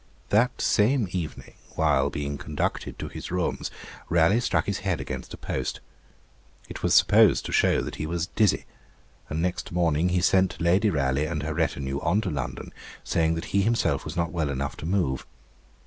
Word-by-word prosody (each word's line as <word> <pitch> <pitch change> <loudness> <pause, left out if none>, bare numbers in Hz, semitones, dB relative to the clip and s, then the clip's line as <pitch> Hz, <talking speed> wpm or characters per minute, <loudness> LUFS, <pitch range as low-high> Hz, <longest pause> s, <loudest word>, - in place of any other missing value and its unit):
That 120 +5 +2
same 115 +1 +3
evening, 85 -4 -5 0.2
while 65 +1 +2
being 70 0 -4
conducted 75 -1 -3
to - - -5
his - - -7
rooms, 90 -1 -2 0.4
Raleigh 85 +6 +4
struck 120 - 0
his 100 -1 -2
head 95 -4 -1
against - - -6
a - - -14
post. - - -3 0.9
It - - -8
was - - +2
supposed - - +5
to - - -4
show - - +3
that - - -6
he 75 - -3
was 85 0 -1
dizzy; 105 +3 +1 0.6
and 80 +3 -2
next 90 0 -2
morning 85 -1 +2
he 90 0 +1
sent 95 +1 +2
Lady 90 +5 +3
Raleigh 70 -2 0
and 75 -3 -3
her 80 +1 -2
retinue 70 -4 -1
on 95 +8 +1
to 95 -5 -3
London, 65 -4 -5 0.3
saying 80 0 +1
that 80 - -4
he 100 - +4
himself 115 +3 +1
was 80 +1 -6
not 85 +1 0
well 80 -5 -1
enough 70 0 -3
to 80 - -6
move. 85 -8 0
85 Hz, 180 wpm, -26 LUFS, 75-95 Hz, 0.9 s, supposed